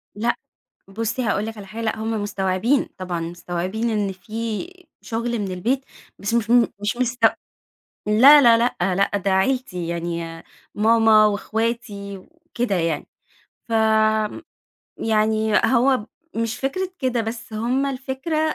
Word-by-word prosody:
لأ، 235 +3 0 0.5
بُصّي 225 +5 -2
هاقول 215 -2 0
لِك 225 0 -6
على 200 - -9
حا 215 +4 -10
لأ، 220 0 -1
هم 220 -1 -2
مستوعبين. 205 +6 0
طبعًا 180 -2 -3
مستوعبين 175 +6 -3
إن 205 -3 0
فيه 225 - -5 0.3
شغل 235 +1 -2
من 195 -3 -3
البيت، 255 +9 -1 0.3
بس 200 +4 -2
مش 230 -1 0
م 240 -1 +6
مش 210 +3 -1
مستو 250 0 +3 0.8
لا 265 +8 +8
لا 235 -3 +7
لأ 235 +2 +1 0.2
لأ، 200 +1 +1
ده 195 0 -1
عيلتي 190 -4 0
يعني 170 -1 -4 0.3
ماما، 220 0 +5
وأخواتي 210 -1 -2
وكده 245 - -4
يعني. 165 -3 -1 0.6
فم 220 +1 +2 0.6
يعني 220 0 +1
هو 260 +1 +4
ب 210 - -8 0.3
مش 230 +1 -1
فكرة 365 +8 -2
كده، 250 -3 0
بس 225 0 -6
هم 245 +6 0
الفكرة 270 +4 -3
أ - - -3
220 Hz, 140 wpm, -22 LUFS, 200-240 Hz, 0.8 s, لا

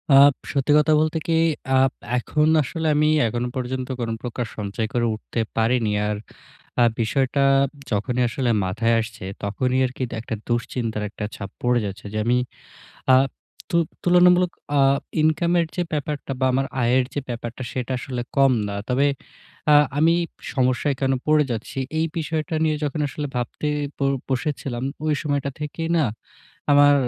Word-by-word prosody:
আব 140 +1 +8 0.2
সত্যি 140 +1 +1
কথা 155 +1 +4
বলতে 155 +1 +1
কি 165 - +2 0.5
আব 135 -1 +4 0.3
এখন 150 +5 +1 0.2
আসলে 160 +4 -3
আমি 150 +1 +3 0.2
এখনো 120 +2 -2
পর্যন্ত 130 0 -3
কোন 115 - -2
প্রকার 125 0 -3
সঞ্চয় 105 +1 -2
করে 120 -1 +1
উঠতে 110 - -6 0.2
পারিনি। 115 -1 +2 0.2
আর 105 -1 -1 0.6
আ - - +7 0.2
বিষয়টা 130 +5 +1 0.5
যখনই 125 +4 0
আসলে 125 -2 -1 0.2
মাথায় 115 +5 +1
আসছে 110 -4 -8 0.2
তখনই 125 +6 0
আরকি 130 +1 -6
এটা 120 - -7
একটা 115 0 -4
দুশ্চিন্তার 115 -2 -2
একটা 105 +1 -5
ছাপ 100 -1 -6
পড়ে 120 0 +2
যাচ্ছে। 100 +1 -7
যে 110 - -2
আমি 120 +1 +3 0.8
আ - - +8 0.6
তু - - +2 0.3
তুলনামূলক 180 0 +5 0.3
আ - - +5 0.4
ইনকামের 170 +2 +2
যে 180 - +1
ব্যাপারটা 145 -1 -3
বা 130 - +3
আমার 135 +1 +1 0.2
আয়ের 125 +2 +3
যে 145 - 0
ব্যাপারটা 120 +1 -5
সেটা 130 0 -3
আসলে 125 -1 -4 0.2
কম 135 -1 +5 0.2
না। 100 - -4
তবে 135 +3 +3 0.7
আ - - +8 0.2
আমি 165 +2 +5 0.4
সমস্যায় 130 +2 +1
কেন 135 -1 +2
পড়ে 155 -1 +4
যাচ্ছি? 115 +3 -4 0.2
এই 165 - +2
বিষয়টা 160 +1 -2
নিয়ে 155 -1 +1
যখন 150 +2 -2
আসলে 145 +1 -4
ভাবতে 125 +5 -2 0.3
ব - - -31 0.3
বসেছিলাম 130 -2 -2 0.2
ওই 155 - +2
সময়টা 145 -2 -1
থেকেই 160 +2 -4
না, 155 - +3 0.7
আমার 145 0 +7
130 Hz, 155 wpm, -23 LUFS, 120-150 Hz, 0.8 s, আব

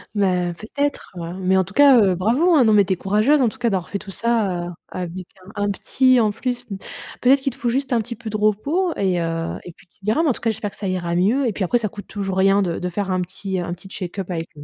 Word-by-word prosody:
Ben 180 -3 +1
peut 215 - -10
être, 285 0 -1
heu, 170 +1 -5
mais 190 0 +2
en 190 - +4
tout 190 - -13
cas, 280 -4 +7
heu, 190 -3 +3
bravo, 260 - +3
hein, 265 - +6
non 220 -1 +4
mais 205 -1 +6
tu 190 - 0
es - - -1
courageuse 215 - +2
en - - +4
tout 265 - -14
cas 235 -1 +1
d'avoir 185 -3 -2
fait 200 - -2
tout 205 - -12
ça, 200 -5 0
heu, - - -6 0.2
avec 180 0 -6 0.3
un 205 0 -1
un - - 0
petit 255 +5 +3
en 215 -2 +3
plus 245 +3 -4
mmh. 195 - -3 0.4
Peut 250 - +3
être 275 0 +6
qu'il 270 -2 -2
te - - -18
faut 240 - 0
juste 265 +1 -1
un 230 - +3
petit 235 +2 -7
peu 220 -1 -7
de 215 - -1
repos 280 - +1
et 185 -3 0
heu, 165 0 -2
et 175 - -9
puis, 165 +3 -22
tu 195 - -37
verras 220 +11 +2
mais 305 - +3
en - - +3
tout - - -10
cas, 230 - +1
j'espère 210 -1 -3
que - - -15
ça 200 - -4
ira 175 -2 -2
mieux 220 +10 +2
et 215 - -1
puis 195 - -2
après, 240 +7 +2
ça 220 -3 -2
coûte 205 0 -10
toujours 195 -2 -4
rien 195 +1 +4
de 170 -2 -2
de 180 - -3
faire 195 +1 -3
un 185 0 +1
petit 190 +1 -4
un 175 0 -4
petit 180 +2 -13
check 185 -1 -7
up 190 -1 -4
avec 165 -1 -4
le 145 - -10
200 Hz, 310 wpm, -21 LUFS, 185-235 Hz, 0.4 s, cas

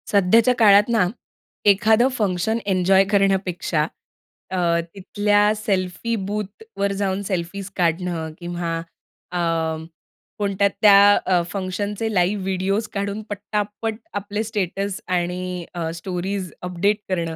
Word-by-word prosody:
सध्याच्या 220 +5 +4
काळात 205 -2 +7
ना, 220 -6 +3 0.6
एखादं 215 +4 +5
फंक्शन 205 +1 0
एन्जॉय 190 0 +4
करण्यापेक्षा 190 -5 +1 0.7
अ, 170 -2 +2 0.2
तिथल्या 205 +2 +2
सेल्फी 200 +1 -1
बूथवर 205 - -3
जाऊन 195 0 0
सेल्फीज 190 +1 -3
काढणं, 170 -2 -1
किंवा 175 -1 -3 0.6
अ, 180 - -3 1.0
कोणत्या 200 -1 +2
त्या 205 -1 +8
अ, 180 -2 +3
फंक्शनचे 205 +3 -3
लाईव्ह 190 +1 +1
व्हिडिओज 195 +3 -1
काढून 200 +1 -2
पटापट 210 +1 -3 0.2
आपले 205 +1 -3
स्टेटस 200 -2 -2
आणि 180 0 -2
अ, 170 -2 -3
स्टोरीज 185 +1 -4
अपडेट 180 +4 0
करणं. 170 -3 -1
195 Hz, 105 wpm, -22 LUFS, 180-205 Hz, 1.0 s, त्या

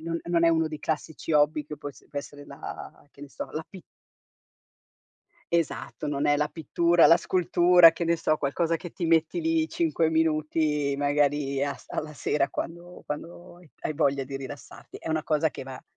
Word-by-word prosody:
non 165 +1 -3
non 170 -1 +2
è - - +6
uno 160 -1 +2
dei 155 -1 -7
classici 160 0 -4
hobby 150 0 +3
che 150 0 -8
può - - -6
es 140 - -14
può 145 - -3
essere 145 0 -9
la 140 +1 -9
che 140 - -18
ne 145 - -9
so, - - -6
la 155 +1 -4
pi 190 - -11 1.7
Esatto, 170 -3 -1
non 145 0 -1
è 145 0 +4
la 150 +1 0
pittura, 170 +2 +3
la 170 - +7
scultura, 175 -1 +5
che 170 - -3
ne 170 0 +2
so, 155 -1 +1
qualcosa 165 +4 0
che 175 +1 -9
ti 170 - -3
metti 165 - +2
lì 325 -1 +1
5 310 - 0
minuti, 155 -2 +1
magari 145 -1 +1
as 145 - -5
alla 150 0 -4
sera 140 +1 0
quando 175 +1 -7
quando 175 +4 -7
hai 175 -4 -19
hai 155 - -3
voglia 140 -3 +1
di 135 +1 -6
rilassarti. 135 +1 -10
È - - -7
una 155 -1 0
cosa 155 +1 +2
che - - -8
va 130 -1 -9
155 Hz, 190 wpm, -27 LUFS, 145-170 Hz, 1.7 s, la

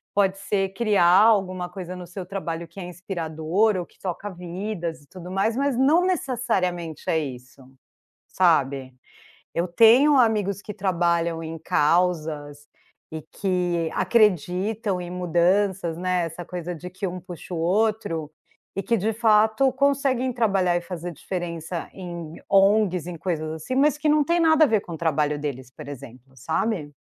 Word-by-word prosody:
pode 195 -1 +2
ser 195 -1 -1
criar 210 -3 +2 0.2
alguma 185 -5 +2
coisa 180 0 -7
no 180 -1 -9
seu 185 +1 -7
trabalho 170 -3 -5
que 170 +4 -13
é - - -5
inspirador 175 +3 -1
ou 180 -2 -2
que - - -28
toca 190 +2 -4
vidas 175 -1 -5
e - - -25
tudo 180 +1 -10
mais, 195 +4 0
mas 275 -1 0
não 290 +7 +4
necessariamente 195 - -1
é 160 - +2
isso, 130 -2 -8 0.7
sabe. 140 -7 +1 0.6
Eu 170 +2 0
tenho 245 - +6
amigos 210 -5 +2
que 210 - -7
trabalham 170 -4 0
em 165 0 -6
causas 150 -3 0 0.4
e 160 0 -5
que 175 -2 -1
acreditam 200 -1 +1
em 175 0 -7
mudanças, 180 0 +1
né. 180 -1 0
Essa 165 +2 -7
coisa 180 -1 -5
de 180 +3 -8
que 185 +2 -5
um 180 0 -5
puxa 180 0 -9
o - - -2
outro, 175 -3 0 0.4
e 195 - -2
que 235 - +1
de 215 +3 0
fato 220 +3 +3
conseguem 270 -2 +1
trabalhar 195 -7 +1
e 175 - -3
fazer 175 -1 -6
diferença 170 -1 -5
em 170 -3 -8
ONGs, 195 -3 +3
em 175 -1 -6
coisas 155 -2 -3
assim, 160 +11 -5
mas 290 +2 +3
que 300 +1 -1
não 300 0 +4
tem 340 +4 +1
nada 320 -1 +5
a - - +6
ver 220 -4 +2
com 175 - -9
o - - -5
trabalho 150 -2 0
deles, 130 -4 -5
por 150 +2 -11
exemplo, 130 -2 -11
sabe. 160 - -2
180 Hz, 160 wpm, -24 LUFS, 165-210 Hz, 0.7 s, tenho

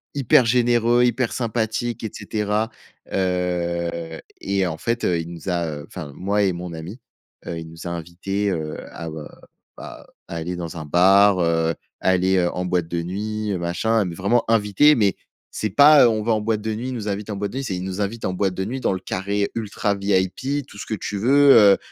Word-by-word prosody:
Hyper 130 -2 +4
généreux, 120 0 +3
hyper 125 0 +1
sympathique 115 0 -2
et 110 - -4
cetera. 105 +1 -2 0.4
Heu 85 -3 -2 0.2
et 100 -1 0
en 80 -2 -4
fait 115 +7 -2
heu, 85 -2 +1
il 85 +1 -6
nous 85 +2 -7
a, 85 -1 0
heu, 75 -2 -6
enfin, 75 - -8
moi 100 +2 0
et 95 -2 +2
mon 90 0 -6
ami, 85 +9 -8 0.5
heu, 85 - -4
il 80 - -8
nous 80 +2 -11
a - - -2
invités, 90 +4 -3
heu, 80 -3 -3
à, 85 -1 -7
heu, 80 -1 -7 0.5
bah - - -10
heu, - - -29
aller 85 +2 -4
dans 85 -1 -6
un 80 - -6
bar, 95 +5 +5
heu, 80 -1 +1 0.3
aller 95 0 +2
en 90 +1 -3
boîte 90 -2 0
de 85 0 -2
nuit, 105 +4 -3
heu, - - -1
machin. 100 +6 0
Mais 85 -2 -5
vraiment 100 +7 +1
invités, 115 +7 +4
mais 100 -4 +2 0.4
c'est 110 - -2
pas, 145 +7 +7
heu, - - +5
on 110 -1 -1
va 115 - 0
en 110 - 0
boîte 110 0 -1
de 110 +1 -2
nuit, 120 +4 -4
il - - -4
nous 110 -3 -5
invite 100 +1 -4
en - - -3
boîte 100 0 -3
de 130 - -6
nuit, 135 - -2
c'est, 95 - -2
il 90 - -4
nous 95 +1 -4
invite 110 +3 -3
en 95 - -1
boîte 95 0 -1
de 95 - -2
nuit 130 +6 -4
dans 100 - +1
le 95 - -3
carré 100 +2 -2
ultra 105 -2 -1
VIP, 100 +8 -1
tout 105 - -14
ce - - -6
que - - -3
tu 105 - -5
veux, 140 +6 +6 0.2
heu - - -10
100 Hz, 220 wpm, -22 LUFS, 85-110 Hz, 0.5 s, pas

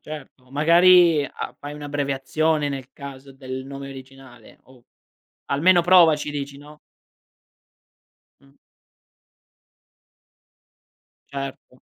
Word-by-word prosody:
certo. 135 -4 -11
Magari 170 +2 +5
a - - -7
fai 145 +1 -8
un'abbreviazione 145 +1 -1
nel 135 -2 -6
caso 140 -1 -11
del 130 -1 -7
nome 140 0 -8
originale 130 -3 -14
o 130 -2 -20 0.6
almeno 175 +5 +3
provaci 165 -4 +4
dici, 140 -1 -6
no? 150 +1 -15 1.6
Mh. 140 0 -25 2.7
Certo. 135 -2 -8
140 Hz, 85 wpm, -22 LUFS, 135-150 Hz, 2.7 s, Magari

